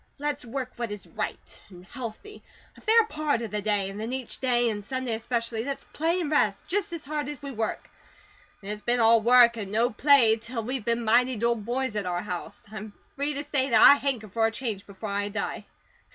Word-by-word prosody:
LET'S 290 Hz, 0 st, -3 dB
WORK 255 Hz, +1 st, -4 dB
WHAT 235 Hz, -1 st, -3 dB
IS 205 Hz, -1 st, -6 dB
RIGHT, -, -, -6 dB
AND 180 Hz, -2 st, -14 dB
HEALTHY, 255 Hz, -, -8 dB, 0.3 s
A -, -, -16 dB
FAIR 450 Hz, +1 st, +5 dB
PART 300 Hz, -, -1 dB
OF 220 Hz, -, -5 dB
THE 210 Hz, 0 st, -2 dB
DAY, 205 Hz, -2 st, 0 dB
AND 195 Hz, +2 st, -6 dB
THEN 225 Hz, +2 st, -4 dB
EACH 260 Hz, -2 st, -5 dB
DAY, 245 Hz, -2 st, +2 dB
AND 205 Hz, -1 st, -5 dB
SUNDAY 255 Hz, +2 st, -3 dB
ESPECIALLY, 230 Hz, 0 st, -2 dB
LET'S 275 Hz, +1 st, -4 dB
PLAY 335 Hz, +4 st, 0 dB
AND 310 Hz, -3 st, -3 dB
REST, 205 Hz, -9 st, +1 dB
JUST 390 Hz, -1 st, -1 dB
AS 335 Hz, -3 st, -5 dB
HARD 295 Hz, -1 st, -3 dB
AS 295 Hz, -, -6 dB
WE 280 Hz, -, -5 dB
WORK. 225 Hz, -3 st, -3 dB, 0.8 s
IT'S 210 Hz, +1 st, -5 dB
BEEN 240 Hz, +2 st, +1 dB
ALL 225 Hz, 0 st, +5 dB
WORK 235 Hz, 0 st, +6 dB
AND 200 Hz, -3 st, -5 dB
NO 230 Hz, +4 st, +2 dB
PLAY 240 Hz, -2 st, +5 dB
TILL 230 Hz, +1 st, -5 dB
WE'VE 250 Hz, -1 st, -3 dB
BEEN 235 Hz, 0 st, 0 dB
MIGHTY 245 Hz, +3 st, +4 dB
'DULL 235 Hz, +2 st, +1 dB
BOYS' 240 Hz, +2 st, -2 dB
AT 205 Hz, -3 st, -2 dB
OUR 175 Hz, 0 st, -2 dB
HOUSE; 180 Hz, -4 st, -6 dB
I'M 215 Hz, -1 st, -8 dB, 0.2 s
FREE 290 Hz, 0 st, 0 dB
TO 285 Hz, -, 0 dB
SAY 285 Hz, -2 st, 0 dB
THAT 235 Hz, -, +5 dB
I -, -, +11 dB
HANKER 255 Hz, -7 st, -2 dB
FOR 225 Hz, +3 st, +2 dB
A -, -, -3 dB
CHANGE 225 Hz, -4 st, -4 dB
BEFORE 200 Hz, +2 st, -7 dB
I 205 Hz, 0 st, -1 dB
DIE." 215 Hz, +2 st, -4 dB
235 Hz, 220 wpm, -27 LUFS, 215-270 Hz, 0.8 s, I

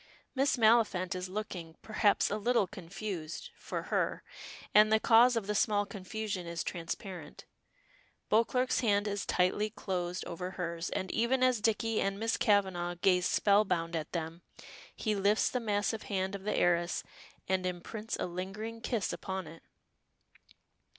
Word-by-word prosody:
Miss 270 Hz, 0 st, +2 dB
Maliphant 215 Hz, -6 st, +3 dB
is 185 Hz, 0 st, -4 dB
looking, 185 Hz, -5 st, -5 dB
perhaps, 215 Hz, -2 st, +2 dB
a 210 Hz, -, 0 dB
little 235 Hz, 0 st, +2 dB
confused 180 Hz, -3 st, -6 dB
for -, -, -5 dB
her -, -, 0 dB, 0.5 s
and 215 Hz, +1 st, +7 dB
the 220 Hz, -, +5 dB
cause 235 Hz, +3 st, +6 dB
of 225 Hz, -3 st, -1 dB
the 210 Hz, -, -1 dB
small 205 Hz, -1 st, +2 dB
confusion 200 Hz, -1 st, -5 dB
is 170 Hz, -1 st, -3 dB
transparent. 170 Hz, -1 st, -6 dB, 0.8 s
Beauclerk's 250 Hz, +4 st, +2 dB
hand 205 Hz, -3 st, +2 dB
is 205 Hz, -1 st, -3 dB
tightly 185 Hz, +4 st, +2 dB
closed 180 Hz, -4 st, -3 dB
over 180 Hz, +2 st, -5 dB
hers, 170 Hz, -2 st, -3 dB
and 190 Hz, -, -3 dB
even 250 Hz, +3 st, +2 dB
as 255 Hz, -4 st, +3 dB
Dicky 225 Hz, 0 st, +1 dB
and 195 Hz, 0 st, -1 dB
Miss 225 Hz, +1 st, +1 dB
Kavanagh 190 Hz, -5 st, +1 dB
gaze 180 Hz, -2 st, +4 dB
spellbound 185 Hz, -5 st, +2 dB
at 160 Hz, -2 st, -3 dB
them, 165 Hz, 0 st, -4 dB, 0.5 s
he 215 Hz, -, -1 dB
lifts 205 Hz, +1 st, +2 dB
the 250 Hz, -, 0 dB
massive 210 Hz, -1 st, -1 dB
hand 190 Hz, -1 st, -1 dB
of 200 Hz, -1 st, -6 dB
the 210 Hz, -, 0 dB
heiress 175 Hz, 0 st, +2 dB, 0.4 s
and 190 Hz, 0 st, +1 dB
imprints 210 Hz, +5 st, -4 dB
a -, -, -2 dB
lingering 195 Hz, +6 st, -5 dB
kiss 230 Hz, -4 st, -1 dB
upon 190 Hz, -1 st, -4 dB
it. 160 Hz, +1 st, -12 dB
200 Hz, 150 wpm, -32 LUFS, 180-220 Hz, 0.8 s, and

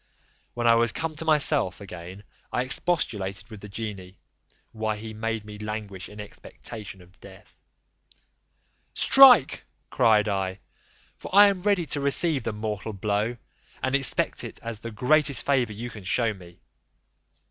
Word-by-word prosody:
When 120 Hz, 0 st, -3 dB
I 115 Hz, -, +6 dB
was 115 Hz, -1 st, +3 dB
come 160 Hz, -1 st, -4 dB
to 160 Hz, -, -3 dB
myself 150 Hz, -, +2 dB
again, 95 Hz, 0 st, -10 dB, 0.3 s
I 125 Hz, -, 0 dB
expostulated 115 Hz, -, -1 dB
with 105 Hz, -2 st, -10 dB
the 105 Hz, -, -10 dB
genie, 100 Hz, -3 st, -7 dB, 0.5 s
why 110 Hz, -1 st, -3 dB
he 110 Hz, +1 st, -8 dB
made 110 Hz, 0 st, -4 dB
me 105 Hz, 0 st, -10 dB
languish 105 Hz, -3 st, -6 dB
in 105 Hz, -, -13 dB
expectation 105 Hz, -1 st, -10 dB
of 90 Hz, +2 st, -23 dB
death: 100 Hz, +1 st, -16 dB, 1.4 s
"Strike," 250 Hz, -, +6 dB, 0.3 s
cried 110 Hz, -4 st, +3 dB
I, 95 Hz, -1 st, -2 dB, 0.6 s
"for -, -, -9 dB
I 205 Hz, 0 st, +8 dB
am 195 Hz, -2 st, -3 dB
ready 200 Hz, -3 st, +1 dB
to 145 Hz, 0 st, -3 dB
receive 140 Hz, +1 st, +2 dB
the 115 Hz, -, -2 dB
mortal 105 Hz, 0 st, -5 dB
blow, 105 Hz, +4 st, -2 dB, 0.5 s
and 130 Hz, -, -1 dB
expect 135 Hz, -2 st, +1 dB
it -, -, -8 dB
as 115 Hz, -2 st, -5 dB
the 115 Hz, -, -7 dB
greatest 140 Hz, +5 st, +2 dB
favour 125 Hz, -6 st, +1 dB
you 120 Hz, +3 st, -7 dB
can 105 Hz, -3 st, -11 dB
show 110 Hz, +4 st, +1 dB
me." 90 Hz, -3 st, -15 dB
110 Hz, 150 wpm, -25 LUFS, 100-130 Hz, 1.4 s, I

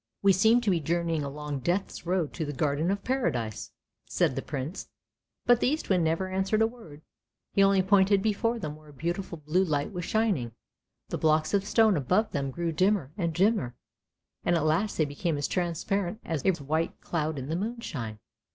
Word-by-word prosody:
" -, -, -58 dB
We 200 Hz, -1 st, +6 dB
seem 220 Hz, +6 st, +4 dB
to 215 Hz, -4 st, +1 dB
be 175 Hz, -, +2 dB
journeying 165 Hz, 0 st, 0 dB
along 145 Hz, 0 st, -4 dB
Death's 175 Hz, +4 st, -2 dB
road 175 Hz, -4 st, 0 dB
to 165 Hz, -, -3 dB
the 145 Hz, -1 st, -4 dB
Garden 150 Hz, +3 st, 0 dB
of 200 Hz, +1 st, -1 dB
Paradise! 145 Hz, -, -1 dB, 0.2 s
" -, -, -57 dB
said -, -, +3 dB
the -, -, -2 dB
Prince, 145 Hz, +6 st, -5 dB, 0.6 s
but 245 Hz, -1 st, +5 dB
the -, -, +2 dB
Eastwind 205 Hz, -, +1 dB
never 165 Hz, +4 st, 0 dB
answered 190 Hz, +3 st, +1 dB
a -, -, +5 dB
word, 220 Hz, -11 st, -9 dB, 0.5 s
he 200 Hz, -, +3 dB
only 195 Hz, -1 st, +5 dB
pointed 195 Hz, 0 st, +4 dB
before 225 Hz, +2 st, +1 dB
them 150 Hz, -9 st, -5 dB
where 155 Hz, 0 st, -17 dB
a -, -, -14 dB
beautiful 170 Hz, +4 st, -3 dB
blue 155 Hz, +5 st, +1 dB
light 150 Hz, 0 st, -1 dB
was 175 Hz, -1 st, -4 dB
shining. 185 Hz, -, 0 dB, 0.6 s
The -, -, -3 dB
blocks 155 Hz, +1 st, +2 dB
of 200 Hz, -1 st, +2 dB
stone 220 Hz, -1 st, +4 dB
above 185 Hz, -, +1 dB
them 140 Hz, -1 st, -1 dB
grew 170 Hz, +4 st, -2 dB
dimmer 185 Hz, -3 st, +1 dB
and 170 Hz, -5 st, -1 dB
dimmer, 185 Hz, -, +1 dB, 0.7 s
and 175 Hz, -, +2 dB
at 160 Hz, -2 st, +1 dB
last 170 Hz, +7 st, +1 dB
they 155 Hz, -, +3 dB
became 145 Hz, +2 st, -2 dB
as 145 Hz, -, -1 dB
transparent 180 Hz, +3 st, -1 dB
as 155 Hz, -5 st, -2 dB
a 175 Hz, -6 st, +1 dB
white 155 Hz, +4 st, -1 dB
cloud 155 Hz, -2 st, -2 dB
in 135 Hz, +1 st, -5 dB
the 160 Hz, -, -1 dB
moonshine. 175 Hz, -, -4 dB
170 Hz, 195 wpm, -28 LUFS, 150-200 Hz, 0.7 s, We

